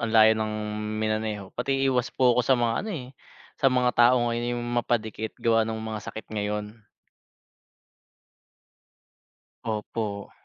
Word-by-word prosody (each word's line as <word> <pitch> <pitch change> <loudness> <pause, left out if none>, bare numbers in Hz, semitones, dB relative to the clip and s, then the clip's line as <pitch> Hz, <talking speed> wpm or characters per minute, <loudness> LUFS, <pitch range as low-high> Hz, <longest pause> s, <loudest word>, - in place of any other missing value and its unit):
ang 115 - -1
layo 110 0 +7
ng 110 -1 -2 0.5
minaneho 110 -2 -2
pati 135 +2 0
iwas 125 -1 +1
po 125 -2 +4
ako 125 - +3
sa 130 +2 +3
mga, 115 -1 +1
ano, 220 - -5
eh 140 -10 -5 0.5
sa 135 - +7
mga 125 -1 +2
tao 120 +2 +6
ngayon 120 +1 -1
yung 120 - -4
mapadikit 110 -2 -1
gawa 115 -1 +3
nung 110 0 -3
mga 110 -1 -4
sakit 110 - -7
ngayon. 105 0 -2 2.9
Opo. 105 -2 -3
115 Hz, 140 wpm, -26 LUFS, 110-125 Hz, 2.9 s, layo